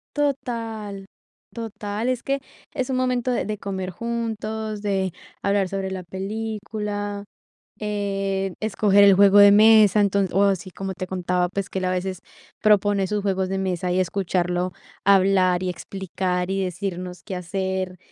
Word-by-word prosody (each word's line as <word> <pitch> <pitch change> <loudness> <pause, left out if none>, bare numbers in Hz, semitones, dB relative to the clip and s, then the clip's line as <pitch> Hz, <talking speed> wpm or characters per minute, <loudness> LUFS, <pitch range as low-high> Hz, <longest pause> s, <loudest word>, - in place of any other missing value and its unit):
Total. 225 -8 -3 0.5
Total, 220 0 -4
es 250 -2 -1
que 275 0 0 0.3
es 260 -3 -2
un 260 - 0
momento 255 -1 0
de 245 - 0
de 210 0 -3
comer 190 -2 -4
juntos, 220 0 -4
de 190 -3 -1 0.3
hablar 200 -1 +1
sobre 195 0 -3
la 185 -1 -5
película, 205 +1 -4 0.6
eh, 195 -2 -2
escoger 205 -2 +3
el 200 - +7
juego 200 +1 +6
de 205 0 +9
mesa. 215 -1 +7
Enton 200 -1 +2
o 195 +3 +4
así, 190 -2 0
como 195 +1 -5
te 185 +1 -5
contaba, 180 -1 0
pues, 195 +1 -3
que 190 - -3
él, 185 - -2
a 185 - +1
veces, 185 0 -2 0.4
propone 205 -2 +3
sus 210 0 -1
juegos 190 -2 0
de 195 - -2
mesa, 180 -2 -1
y 185 - +2
escucharlo 180 -1 -1 0.3
hablar 190 -2 +4
y 185 - -1
explicar, 180 -1 -3
y 195 0 0
decirnos 180 0 -5
qué 195 - -5
hacer, 185 0 -3
195 Hz, 155 wpm, -23 LUFS, 185-210 Hz, 0.6 s, de